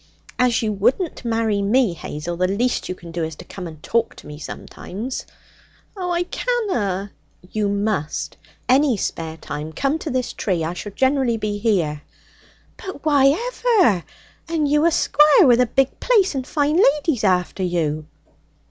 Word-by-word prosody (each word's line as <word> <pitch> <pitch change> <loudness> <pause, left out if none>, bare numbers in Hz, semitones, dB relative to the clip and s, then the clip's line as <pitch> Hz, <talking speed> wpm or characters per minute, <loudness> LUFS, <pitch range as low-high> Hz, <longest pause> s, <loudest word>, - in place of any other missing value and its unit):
'As 245 -2 +3
you 215 -1 0
wouldn't 250 - 0
marry 225 -3 0
me, 215 0 +2
Hazel, 170 +1 -5
the 185 +1 +1
least 235 +6 -1
you 185 - -3
can 170 -2 -11
do 170 0 -2
is 160 -1 -4
to 180 - -12
come 180 -1 -7
and 155 -2 -12
talk 230 -1 0
to - - -14
me 150 0 -9
sometimes.' 215 - -6 0.7
'Oh, 365 -2 -3
I 350 0 +1
canna!' 245 - -1 0.4
'You 210 -2 0
must. 200 -6 -2 0.3
Any 265 -2 +4
spare 160 -3 -4
time 150 0 -6
come 280 - -1
to 315 - -5
this 255 -2 -2
tree. 180 -5 -1
I 165 +2 -2
shall 205 +3 -7
generally 260 -1 +2
be 210 -1 -3
here.' 175 -9 0 0.8
'But 375 -6 -8
why 285 -3 +5
ever? 390 - +2 0.5
And 320 -3 +1
you 295 +2 +3
a - - +3
squire 300 -1 +5
with 245 -2 +5
a 250 - +3
big 270 +3 0
place 420 -8 +3
and 265 -2 -4
fine 300 +1 +1
ladies 295 - +3
after 185 -1 +1
you!' 155 -4 -1
225 Hz, 165 wpm, -21 LUFS, 180-285 Hz, 0.8 s, why